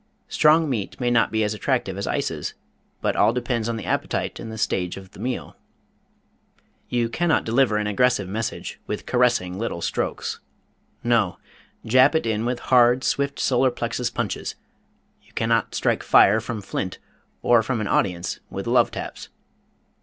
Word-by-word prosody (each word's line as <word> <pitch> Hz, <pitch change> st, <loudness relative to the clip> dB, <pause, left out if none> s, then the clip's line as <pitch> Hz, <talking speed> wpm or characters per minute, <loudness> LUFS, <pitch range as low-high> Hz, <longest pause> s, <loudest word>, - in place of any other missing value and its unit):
Strong 155 Hz, +1 st, +4 dB
meat 115 Hz, -8 st, -3 dB
may 120 Hz, -1 st, +1 dB
not 115 Hz, -1 st, +3 dB
be 110 Hz, 0 st, +1 dB
as 105 Hz, 0 st, 0 dB
attractive 105 Hz, -, -1 dB
as -, -, -4 dB
ices, -, -, -2 dB, 0.5 s
but -, -, 0 dB
all -, -, +4 dB
depends 120 Hz, -2 st, -2 dB
on 115 Hz, -, -2 dB
the 105 Hz, -, -6 dB
appetite -, -, -2 dB
and 110 Hz, -, -7 dB
the 110 Hz, -, -7 dB
stage 90 Hz, -4 st, -1 dB
of 95 Hz, -1 st, -11 dB
the -, -, -15 dB
meal. 125 Hz, 0 st, -4 dB, 1.3 s
You 120 Hz, -1 st, +1 dB
can 170 Hz, +9 st, -1 dB
not 160 Hz, -, +3 dB
deliver 115 Hz, -1 st, +2 dB
an 105 Hz, -, -1 dB
aggressive 105 Hz, -1 st, +2 dB
message 110 Hz, +3 st, -4 dB
with -, -, -4 dB
caressing 120 Hz, -7 st, +1 dB
little 115 Hz, -6 st, -3 dB
strokes. -, -, -3 dB, 0.6 s
No! 115 Hz, -6 st, +2 dB, 0.5 s
Jab 130 Hz, +6 st, +5 dB
it 160 Hz, -, +1 dB
in 110 Hz, 0 st, -1 dB
with 125 Hz, 0 st, -2 dB
hard, 125 Hz, +1 st, +5 dB
swift 140 Hz, 0 st, 0 dB
solar 130 Hz, 0 st, +3 dB
plexus 120 Hz, 0 st, -2 dB
punches. 120 Hz, -3 st, -3 dB, 0.7 s
You -, -, -26 dB
cannot 115 Hz, 0 st, 0 dB
strike -, -, +1 dB
fire 105 Hz, +3 st, +5 dB
from 115 Hz, -2 st, -5 dB
flint 95 Hz, -1 st, -4 dB, 0.5 s
or 120 Hz, -1 st, +5 dB
from 115 Hz, +1 st, -2 dB
an 105 Hz, -, -2 dB
audience 90 Hz, -3 st, 0 dB
with -, -, -5 dB
love -, -, +3 dB
taps. -, -, -7 dB
115 Hz, 165 wpm, -23 LUFS, 105-125 Hz, 1.3 s, Jab